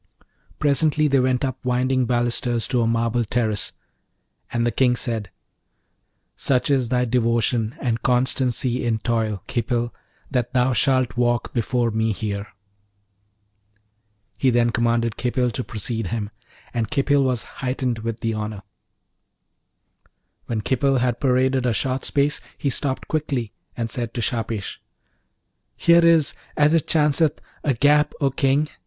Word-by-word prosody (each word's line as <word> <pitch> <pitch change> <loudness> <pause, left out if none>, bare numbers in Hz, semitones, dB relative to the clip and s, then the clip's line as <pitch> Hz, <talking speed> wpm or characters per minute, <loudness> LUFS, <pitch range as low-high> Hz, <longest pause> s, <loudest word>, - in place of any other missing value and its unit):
Presently 150 +1 +2
they 135 -1 +3
went 130 +1 +1
up 130 0 -5
winding 125 0 +1
balusters 120 -1 0
to 125 -2 +2
a 115 - +2
marble 115 +1 +1
terrace, 110 -2 -1 0.8
and 120 0 0
the 120 - +1
King 125 +2 +3
said, 115 -5 -3 1.1
'Such 135 +3 +1
is 130 -4 +2
thy 125 0 +2
devotion 115 -1 +1
and 115 -2 -1
constancy 125 0 +1
in 115 -2 +1
toil, 110 -3 -1
Khipil, 120 0 -1 0.4
that 125 -1 -1
thou 125 +1 +3
shaft 130 +1 +1
walk 120 -1 +1
before 120 0 0
me 110 0 0
here.' 100 0 -4 1.9
He 135 - +3
then 120 -1 +3
commanded 115 -1 0
Khipil 125 0 0
to 125 - -3
precede 110 -1 -3
him, 105 0 -3 0.4
and 115 -3 -1
Khipil 140 -1 +2
was 125 -3 0 0.2
heightened 125 -2 -1
with 115 0 -4
the 115 -1 -1
honour. 105 -2 -5 1.8
When 115 -2 -2
Khipil 135 +4 +1
had 125 -1 0
paraded 130 -1 +2
a 120 - +2
short 130 +3 -2
space 145 +1 +1 0.2
he 140 - -1
stopped 130 0 -2
quickly, 140 -8 -2 0.2
and 115 -1 -1
said 120 0 -5
to 120 - -1
Shahpesh, 115 -2 -3 1.0
'Here 170 0 +5
is, 165 -3 +4 0.2
as 150 +1 +4
it 165 -3 +2
chanceth, 150 0 +2 0.2
a 140 -4 +1
gap, 145 +4 +3
O 140 -2 +2
King! 135 +3 +2
125 Hz, 140 wpm, -22 LUFS, 115-135 Hz, 1.9 s, Here